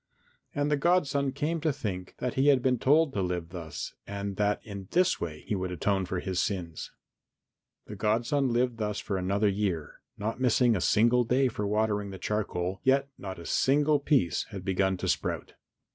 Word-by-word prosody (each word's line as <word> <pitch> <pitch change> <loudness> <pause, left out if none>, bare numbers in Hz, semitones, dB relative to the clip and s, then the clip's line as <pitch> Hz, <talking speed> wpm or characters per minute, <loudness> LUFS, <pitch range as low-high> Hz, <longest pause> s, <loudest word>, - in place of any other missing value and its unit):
And 145 +1 0
the 145 - +3
godson 140 -4 +2
came 150 +4 -2
to 155 0 +2
think 95 -8 -5
that 125 -1 -2
he 135 +2 +2
had 135 -4 +5
been 125 -2 +2
told 150 +3 +4
to 100 - 0
live 90 -2 -2
thus 85 -4 -6
and 100 0 -4
that 105 0 +1
in 100 -3 -7
this 185 +1 +2
way 75 -3 -4
he - - -2
would 95 -2 -2
atone 95 +2 0
for 90 -1 -2
his 95 -1 -2
sins. 85 -5 -3 1.0
The 105 - -8
godson 120 +6 +1
lived 120 0 +1
thus 105 -1 -1
for 100 - -3
another 100 +3 +1
year, 95 -6 -2 0.2
not 110 +4 -3
missing 125 -1 +4
a 95 - -1
single 120 +6 +4
day 130 +3 +2
for 105 -3 -3
watering 105 -1 0
the 95 - -7
charcoal, 95 -2 -2
yet 135 +1 +3
not 95 -1 -6
a 85 - -10
single 145 - +3
piece 140 - +1
had 100 -4 -8
begun 95 0 +1
to - - -3
sprout. - - -1
105 Hz, 190 wpm, -29 LUFS, 95-135 Hz, 1.0 s, had